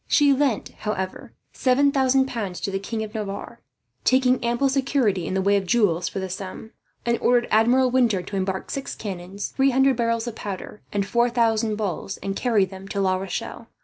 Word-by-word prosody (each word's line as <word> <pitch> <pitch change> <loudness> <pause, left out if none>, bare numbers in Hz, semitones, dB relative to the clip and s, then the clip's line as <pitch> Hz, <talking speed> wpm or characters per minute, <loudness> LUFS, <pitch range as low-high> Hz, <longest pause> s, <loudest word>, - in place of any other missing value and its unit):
She 285 -2 +5
lent, 270 -5 0
however, 190 -3 -4 0.2
7000 265 0 +3
pounds 210 -8 -4
to 195 - -2
the 195 - -1
King 220 +3 -4
of 215 -1 -8
Navarre, 200 -2 -5 0.4
taking 255 -1 +3
ample 240 +3 +1
security 265 - +1
in 190 - -2
the 190 - +1
way 200 +1 +3
of 195 -2 -3
jewels 180 -6 +2
for - - -7
the 190 -1 -2
sum; 190 +4 -7 0.3
and 235 0 +1
ordered 245 -1 +3
Admiral 245 +4 +4
Winter 235 -8 +2
to 200 - -7
embark 190 0 -2
six 275 - -4
cannons, 195 -1 -5
three 270 0 +4
hundred 265 -1 +3
barrels 230 -1 0
of 240 - -4
powder, 205 0 -7
and 200 -1 0
four 235 +4 +2
thousand 225 -2 +1
balls, 200 -2 -3
and 195 0 -4
carry 220 -5 +2
them 190 +1 -10
to 200 - -3
La 190 -1 +2
Rochelle. 195 +5 -5
220 Hz, 190 wpm, -24 LUFS, 195-250 Hz, 0.4 s, She